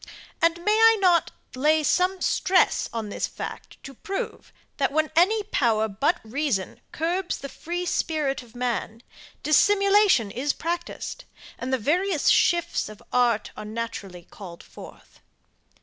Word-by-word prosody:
And 335 0 +3
may 420 - +3
I 450 0 +6
not 360 -3 +3 0.2
lay 305 +4 +2
some 365 +4 +1
stress 370 0 +2
on 225 -2 -4
this - - -2
fact - - -8
to 275 - -9
prove, 390 +9 -6 0.3
that 275 - +1
when 310 +1 0
any 415 +6 +3
power 230 - +1
but 245 - 0
reason 230 -4 -2
curbs 350 +3 -2
the 275 - -7
free 350 +6 -5
spirit 300 -6 -1
of 240 -1 -18
man, 240 -2 -3 0.4
dissimulation 395 - +4
is 275 +6 -1
practised, 340 +1 -5 0.3
and 255 - -4
the 260 - +2
various 325 - +1
shifts 345 - +2
of 215 - -13
art 240 -4 +2
are - - -7
naturally 215 -5 -6
called 175 -2 -12
forth? - - -14
295 Hz, 140 wpm, -25 LUFS, 230-355 Hz, 0.4 s, I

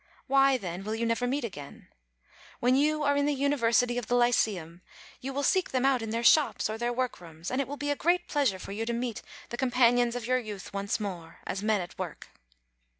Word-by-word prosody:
Why, 270 -1 +4
then, 185 -4 -6
will 215 +2 -3
you 230 +1 -1
never 230 +2 0
meet 275 +2 -1
again? 145 -11 -8 0.7
When 250 +2 +3
you 300 +2 +2
are 285 0 +3
in 285 0 +2
the 295 - +1
University 245 -3 +2
of 240 - -8
the 245 - +1
Lyceum, 200 -8 +1 0.4
you 270 - -5
will 280 +1 -2
seek 370 +6 +2
them 260 0 0
out 270 -3 +3
in 225 - -4
their 230 +2 -2
shops 290 -4 +4
or 220 - -5
their 240 +1 0
workrooms, 175 -10 -4
and 255 +2 +1
it 270 - -3
will 285 +2 -6
be 290 0 -2
a - - +1
great 345 +5 +1
pleasure 275 -10 +1
for 185 - -9
you 215 +3 -3
to 235 - 0
meet 235 -1 -3 0.3
the 240 - -5
companions 245 -1 +3
of 245 -2 -4
your 255 +1 +2
youth 210 -4 -8
once 200 +2 -2
more, 175 -6 -6
as 195 - -3
men 215 -2 +1
at 175 - -9
work. - - -6
240 Hz, 225 wpm, -29 LUFS, 210-270 Hz, 0.7 s, Why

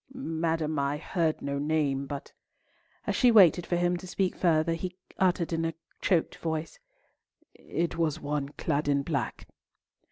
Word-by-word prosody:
"Madam, 160 - -1
I 140 +1 0
heard 160 0 -1
no 140 0 -2
name, 145 -2 0
but"—as 140 0 -9
she 250 - +5
waited 185 -6 +6
for 175 - +1
him 175 0 +1
to 185 +1 -9
speak 185 0 0
further, 165 -1 +2
he 180 +2 -4 0.2
uttered 180 -3 +2
in 165 0 0
a 165 -1 -2 0.3
choked 175 -5 +1
voice—"it 160 - -3 1.2
was 160 -3 +1
one 145 -1 -2
clad 145 +1 0
in 140 -1 +2
black." 140 -7 -3
160 Hz, 140 wpm, -29 LUFS, 145-175 Hz, 1.2 s, waited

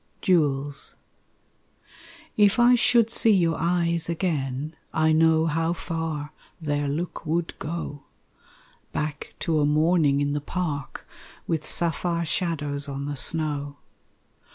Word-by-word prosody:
Jewels 145 -5 0 1.4
If 205 0 +4
I 240 +1 +6
should 235 -2 +4
see 225 -1 +4
your 170 -3 +2
eyes 170 0 +1
again, 155 -4 -2 0.2
I 160 0 +2
know 160 0 +4
how 165 +1 0
far 160 -3 -4 0.3
their 145 -2 -1
look 160 +5 -4
would 165 +1 -1
go 150 -3 -5 0.9
Back 150 -1 -4
to 160 -2 +1
a 145 - +3
morning 155 -1 +3
in 145 0 0
the 145 - -2
park 145 -3 -4 0.4
With 160 -2 -1
sapphire 170 +1 +1
shadows 145 -4 -2
on 140 0 -4
the 145 0 -4
snow. 145 -1 0
160 Hz, 120 wpm, -25 LUFS, 145-170 Hz, 1.4 s, I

